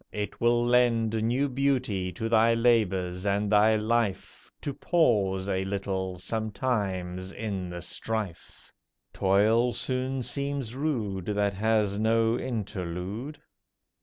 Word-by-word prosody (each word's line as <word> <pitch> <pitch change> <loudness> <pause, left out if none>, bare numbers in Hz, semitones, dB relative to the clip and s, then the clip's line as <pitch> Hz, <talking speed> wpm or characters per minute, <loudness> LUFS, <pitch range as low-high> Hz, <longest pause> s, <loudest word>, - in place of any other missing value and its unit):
It 105 -1 -5
will 120 0 +3
lend 120 -2 +3
New 125 +5 +1
beauty 130 -9 0
to 110 +7 -3
thy 115 0 +4
labours 95 -6 +1
and 100 +1 0
thy 110 +1 +5
life 110 -1 -1
To 145 - -3
pause 100 - +1
a 95 -1 0
little 95 -1 -3
sometimes 95 -3 -2
in 100 -5 -4
the 85 -1 -6
strife. 105 -2 -5 0.4
Toil 110 +5 +3
soon 130 0 -1
seems 140 -1 -3
rude 115 - -2
That 100 -1 +1
has 105 0 +1
no 115 +1 +2
interlude. 105 - -4
110 Hz, 115 wpm, -27 LUFS, 95-120 Hz, 0.4 s, thy